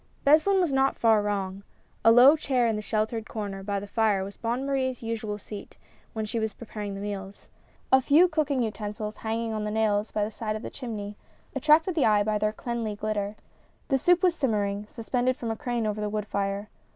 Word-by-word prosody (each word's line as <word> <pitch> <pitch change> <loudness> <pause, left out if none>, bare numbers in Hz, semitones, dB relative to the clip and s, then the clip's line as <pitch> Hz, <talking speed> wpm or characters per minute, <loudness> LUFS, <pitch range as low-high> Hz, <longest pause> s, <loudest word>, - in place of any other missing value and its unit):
Beslin 315 +7 +5
was 345 -6 +1
not 270 0 +2
far 225 -2 +4
wrong. 195 -2 -2 0.4
A 225 - +7
low 250 +6 +8
chair 260 -5 +1
in 225 -2 +1
a 210 - -3
shel 215 +1 0
tered 225 -1 -6
corner 200 -3 -5
by 200 0 -2
the 200 - -7
fire 205 -2 +1
was 200 +1 -7
Bonne 240 +3 -2
Marie's 260 -3 -1
usual 225 -2 -3
seat 210 0 -10 0.4
when 220 -1 -2
she 225 +2 -2
was 220 -1 -2
preparing 210 -3 -6
the - - -6
meals. 200 -1 -6 0.4
A 265 - +6
few 300 +7 +5
cooking 295 -6 0
utensils 210 0 -4
hanging 225 0 -2
on 215 -1 -2
nails 210 0 0
by 210 - 0
the 210 - -3
side 215 0 -3
of 215 - -6
the - - -6
chimney, 210 -5 -6 0.4
attracted 315 +4 +4
the 315 -5 +2
eye 210 -1 +4
by 210 0 0
their 210 0 +1
cleanly 230 -1 -4
glittbr. 210 0 -2 0.5
The 270 -2 +2
soup 355 +5 +3
was 360 -2 +5
simmering, 210 -8 -1
suspended 245 +2 -1
from 230 -2 -3
a - - -2
crane 240 -3 -2
over 210 0 -2
the 210 - -1
wood 210 0 -2
fire. 200 +1 -2
220 Hz, 210 wpm, -27 LUFS, 205-250 Hz, 0.5 s, low